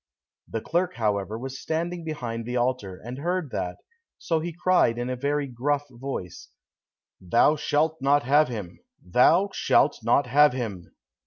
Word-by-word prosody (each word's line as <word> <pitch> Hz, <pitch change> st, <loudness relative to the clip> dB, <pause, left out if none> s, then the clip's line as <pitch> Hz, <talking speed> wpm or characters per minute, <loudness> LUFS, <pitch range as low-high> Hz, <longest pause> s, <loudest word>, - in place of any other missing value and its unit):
The 115 Hz, -, -4 dB
clerk, 175 Hz, +6 st, -1 dB
however, 105 Hz, -1 st, -1 dB
was 135 Hz, +2 st, -7 dB
standing 170 Hz, +2 st, -3 dB
behind 120 Hz, -8 st, -4 dB
the 125 Hz, +1 st, -2 dB
altar 120 Hz, -7 st, -1 dB
and 125 Hz, +3 st, -6 dB
heard 175 Hz, -2 st, -2 dB
that, 90 Hz, 0 st, -3 dB, 0.4 s
so 165 Hz, -2 st, -1 dB
he 170 Hz, +2 st, -4 dB
cried 175 Hz, -8 st, +2 dB
in 120 Hz, +1 st, -3 dB
a -, -, -1 dB
very 145 Hz, +3 st, -1 dB
gruff 140 Hz, +3 st, -1 dB
voice, 120 Hz, -8 st, -7 dB, 0.7 s
"Thou 115 Hz, -, +3 dB
shalt 155 Hz, +2 st, 0 dB
not 140 Hz, +1 st, +3 dB
have 145 Hz, +5 st, +4 dB
him! 105 Hz, -8 st, -7 dB, 0.3 s
Thou 165 Hz, -, +4 dB
shalt -, -, +2 dB
not -, -, +3 dB
have 150 Hz, -1 st, +5 dB
him!" 100 Hz, -9 st, -5 dB
130 Hz, 155 wpm, -25 LUFS, 115-155 Hz, 0.7 s, have